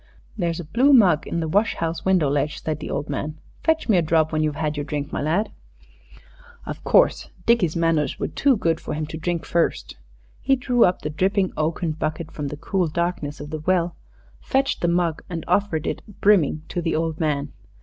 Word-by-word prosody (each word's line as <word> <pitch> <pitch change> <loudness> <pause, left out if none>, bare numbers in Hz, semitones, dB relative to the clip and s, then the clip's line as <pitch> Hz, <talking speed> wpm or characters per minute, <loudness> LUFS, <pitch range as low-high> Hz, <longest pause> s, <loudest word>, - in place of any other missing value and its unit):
"There's 170 -5 -1
a - - -4
blue 250 - +3
mug 190 - +5
in 170 - -2
the 160 - -2
wash 205 +7 +2
house 165 0 -3
window 185 -5 +3
ledge," 145 +2 -1
said 155 -1 -2
the - - -6
old 145 +1 -3
man. 150 +2 -4 0.3
"Fetch 320 0 +1
me 210 -5 +4
a - - +4
drop 160 -1 +2
when 155 -1 0
you've 155 -1 0
had 150 0 -2
your 145 - -2
drink, 145 0 -4
my - - -1
lad." 170 +9 0 1.1
Of - - -7
course, - - +3 0.2
Dickie's 220 -9 +3
manners 165 -3 +1
were - - -2
too 275 -4 +2
good 165 -4 0
for - - -5
him 155 0 -2
to 160 +1 -7
drink 170 0 -2
first. 170 - -1 0.4
He 270 0 +3
drew 245 -2 +3
up 180 - 0
the 150 - -2
dripping 190 +4 +1
oaken 160 +2 -1
bucket 155 +1 -4
from 145 -2 -4
the 150 - -6
cool 185 +3 0
darkness 160 -2 -2
of 145 +1 -8
the 155 - -3
well, 175 +1 +1 0.4
fetched 270 +1 0
the 175 - +2
mug, 170 -2 +1
and 165 -2 -5
offered 195 -7 +1
it - - -2 0.2
brimming 165 -7 +3
to 175 - -2
the 165 -1 -1
old 160 0 -1
man. 145 -2 -1
165 Hz, 210 wpm, -23 LUFS, 155-185 Hz, 1.1 s, mug